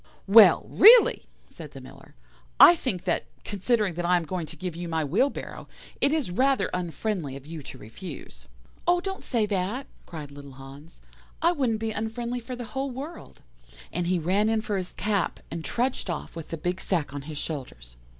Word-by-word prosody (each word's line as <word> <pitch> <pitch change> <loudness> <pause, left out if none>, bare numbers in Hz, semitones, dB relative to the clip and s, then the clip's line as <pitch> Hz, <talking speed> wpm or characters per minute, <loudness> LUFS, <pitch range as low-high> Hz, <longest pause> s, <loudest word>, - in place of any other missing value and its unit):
"'Well, 200 -3 +7
really,' 460 +4 +7 0.2
said 155 -3 -11
the 135 - -9
Miller, 130 - -15 0.4
'I 350 - +10
think 205 - -3
that, 180 -2 0 0.2
considering 205 -1 0
that 175 +1 -4
I 180 +1 +3
am 175 - -2
going 170 0 -4
to - - -9
give 180 -2 -5
you 175 +1 -5
my 160 -1 -1
wheelbarrow, 260 - -1 0.3
it - - +4
is 300 - 0
rather 265 +8 +2
unfriendly 175 -4 -3
of 140 0 -10
you 160 0 -7
to 130 - -10
refuse.' 110 - -10 0.4
"'Oh, 350 0 +4
don't 385 +1 -5
say 230 -4 +1
that,' 205 +6 -2 0.2
cried 150 -4 -8
little 140 -1 -11
Hans, 135 +4 -13 0.4
'I 340 - +5
wouldn't 255 -9 0
be 225 0 -2
unfriendly 235 +3 -3
for 250 +2 -7
the 245 -1 -6
whole 270 +1 -2
world'; 280 +7 -9 0.5
and 175 - -1
he 180 0 +2
ran 190 +6 +1
in 225 -1 +1
for 210 -2 -2
his 180 -1 -7
cap, 200 -2 -1
and 165 0 -5
trudged 245 -1 -2
off 170 -1 -5
with 165 -2 -8
the 165 - -4
big 180 +4 -3
sack 160 -7 -1
on 145 - -5
his 155 - -6
shoulders. 125 - -7
185 Hz, 190 wpm, -26 LUFS, 160-235 Hz, 0.5 s, I